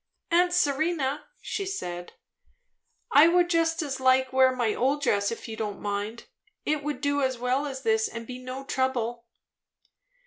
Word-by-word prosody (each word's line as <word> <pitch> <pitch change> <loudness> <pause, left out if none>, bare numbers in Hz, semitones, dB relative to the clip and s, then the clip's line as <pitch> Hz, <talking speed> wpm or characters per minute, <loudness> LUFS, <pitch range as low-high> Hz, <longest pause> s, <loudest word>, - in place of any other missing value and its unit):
"Aunt 355 +1 +4
Serena," 300 -3 0 0.2
she 415 - -3
said, 175 - -5 1.0
"I 295 +3 +8
would 350 0 +3
just 330 -1 +2
as 275 -3 -4
lief 260 0 +3
wear 260 0 +5
my 240 -4 0
old 280 +3 0
dress, 200 -4 +2
if 230 - -6
you 225 - -6
don't 215 -2 -4
mind. 205 +3 -4 0.4
It 300 -1 0
would 295 0 -3
do 285 0 +1
as 260 -2 0
well 255 +4 0
as 265 -1 -6
this, 220 -1 +2
and 230 0 -7
be 250 +1 -7
no 255 +1 -6
trouble." 240 -3 -1
260 Hz, 165 wpm, -27 LUFS, 235-295 Hz, 1.0 s, I